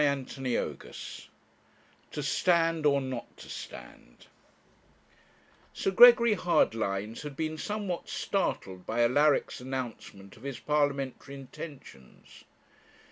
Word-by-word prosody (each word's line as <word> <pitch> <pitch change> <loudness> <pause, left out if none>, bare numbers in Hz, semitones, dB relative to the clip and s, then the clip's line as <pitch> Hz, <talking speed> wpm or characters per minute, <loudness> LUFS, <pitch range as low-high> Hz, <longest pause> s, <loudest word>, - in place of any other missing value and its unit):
CHAPTER 140 -2 -1
XXXIII 125 -2 -4 0.8
TO 150 - -5
STAND, 165 +1 +2
OR 140 -1 +4
NOT 130 -2 -6
TO - - -12
STAND - - -10 1.5
Sir 195 - -1
Gregory 235 +2 +8
Hardlines 110 - 0
had 150 -2 -7
been 155 -1 -2
somewhat 200 0 -4
startled 95 - -2
by 120 +2 +1
Alaric's 145 +3 +2
announcement 120 -6 -6
of - - -17
his 135 -2 -5
parliamentary 140 -2 -1
intentions. 135 - -11
140 Hz, 100 wpm, -29 LUFS, 120-165 Hz, 1.5 s, Gregory